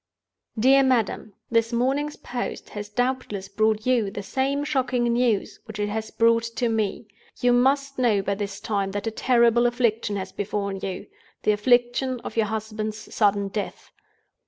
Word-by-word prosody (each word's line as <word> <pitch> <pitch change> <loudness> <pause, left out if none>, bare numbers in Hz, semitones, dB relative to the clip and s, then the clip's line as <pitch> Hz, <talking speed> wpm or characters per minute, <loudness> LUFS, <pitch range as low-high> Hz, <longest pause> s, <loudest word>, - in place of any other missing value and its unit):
"DEAR 265 +5 +6
MADAM, 235 -5 +1 0.2
"This 230 0 +2
morning's 270 +5 0
post 245 0 -5
has 205 0 -7
doubtless 245 -4 -2
brought 215 +2 +1
you 245 -5 +2
the 200 +1 -6
same 275 +6 -1
shocking 255 -4 0
news 235 -3 +1
which 220 -3 -8
it 205 0 -1
has 220 +1 -3
brought 230 0 +3
to 230 +1 -2
me. 220 -1 -1 0.3
You 245 0 +3
must 275 +2 +2
know 220 -6 +3
by 200 - 0
this 200 0 -4
time 200 -2 -2
that 205 +1 -3
a 225 - -1
terrible 240 0 +3
affliction 230 -3 0
has 190 -1 -4
befallen 200 -1 -3
you—the 195 +2 -4
affliction 245 +4 +2
of - - -7
your 225 -2 +2
husband's 215 0 -5
sudden 200 -2 +2
death. 205 +1 -5
225 Hz, 160 wpm, -24 LUFS, 205-245 Hz, 0.3 s, DEAR